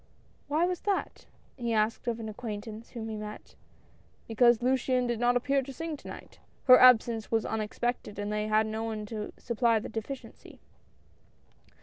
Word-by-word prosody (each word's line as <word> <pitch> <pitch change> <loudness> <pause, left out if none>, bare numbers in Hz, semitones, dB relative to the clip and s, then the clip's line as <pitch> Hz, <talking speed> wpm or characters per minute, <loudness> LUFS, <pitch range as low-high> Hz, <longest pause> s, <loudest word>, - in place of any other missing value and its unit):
"Why 310 +4 +2
was 360 -1 -2
that?" 400 -2 -2 0.3
he 235 -2 -2
asked 220 +2 0
of 235 -1 -1
an 225 - -5
acquaintance, 215 0 -7
whom 225 -3 -6
he 220 -1 -4
met. 210 0 -8 0.4
" - - -33
Because 240 +1 +4
Luciane 255 0 +2
did 240 -2 -1
not 245 +1 +3
appear, 275 +3 +1
to 270 +1 -8
sing 325 +4 -5
to - - -13
night. - - -10 0.2
Her 255 -1 +8
absence 235 -3 +5
was 225 -1 +1
unexpected, 220 0 -3
and 205 +1 -3
they 210 0 -1
had 215 0 +3
no 220 +1 -3
one 220 -2 -4
to 210 0 -5
supply 235 -1 +1
the 215 - -4
deficiency." 225 +5 -8
230 Hz, 175 wpm, -29 LUFS, 215-250 Hz, 0.4 s, Her